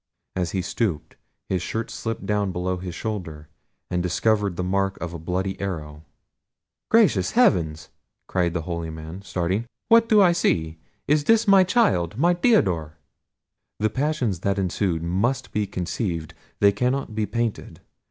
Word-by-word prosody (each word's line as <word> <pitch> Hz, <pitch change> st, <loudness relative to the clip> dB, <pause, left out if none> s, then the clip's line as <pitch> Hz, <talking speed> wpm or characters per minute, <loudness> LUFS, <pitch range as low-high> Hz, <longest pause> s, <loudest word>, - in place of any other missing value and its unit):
As 90 Hz, -2 st, -1 dB
he 95 Hz, 0 st, -2 dB
stooped, 90 Hz, -10 st, -2 dB, 0.3 s
his 95 Hz, -2 st, -1 dB
shirt 110 Hz, +5 st, -3 dB
slipped 115 Hz, -3 st, -4 dB
down 100 Hz, -1 st, 0 dB
below 90 Hz, +1 st, -2 dB
his 90 Hz, -2 st, -6 dB
shoulder, 80 Hz, -9 st, -5 dB, 0.4 s
and 90 Hz, -, 0 dB
discovered 100 Hz, +2 st, +1 dB
the 90 Hz, -, -2 dB
mark 95 Hz, +1 st, 0 dB
of 85 Hz, -1 st, -5 dB
a 85 Hz, -, -6 dB
bloody 95 Hz, +4 st, -3 dB
arrow. 75 Hz, -6 st, -5 dB, 0.9 s
"Gracious 225 Hz, -2 st, +3 dB
heaven!" 135 Hz, -, +3 dB, 0.5 s
cried 90 Hz, -2 st, 0 dB
the 80 Hz, -, -1 dB
holy 85 Hz, -1 st, -4 dB
man, 80 Hz, +3 st, -8 dB
starting; 95 Hz, +4 st, -2 dB, 0.2 s
"what 230 Hz, 0 st, +6 dB
do 215 Hz, -, +6 dB
I 185 Hz, -3 st, +6 dB
see? 80 Hz, -, 0 dB, 0.3 s
It 145 Hz, 0 st, +1 dB
is 225 Hz, 0 st, +5 dB
my 195 Hz, -1 st, +7 dB
child! 180 Hz, -, +1 dB
my 170 Hz, +6 st, +4 dB
Theodore!" 95 Hz, -, +2 dB, 0.8 s
The 110 Hz, 0 st, 0 dB
passions 130 Hz, -, -1 dB
that 100 Hz, +2 st, 0 dB
ensued 90 Hz, -3 st, -1 dB
must 100 Hz, +10 st, -1 dB
be 105 Hz, -1 st, -1 dB
conceived; 90 Hz, -3 st, -3 dB, 0.3 s
they 100 Hz, -, +6 dB
cannot 125 Hz, +3 st, -1 dB
be 105 Hz, -1 st, -1 dB
painted. 115 Hz, +1 st, -3 dB
95 Hz, 150 wpm, -24 LUFS, 85-120 Hz, 0.9 s, my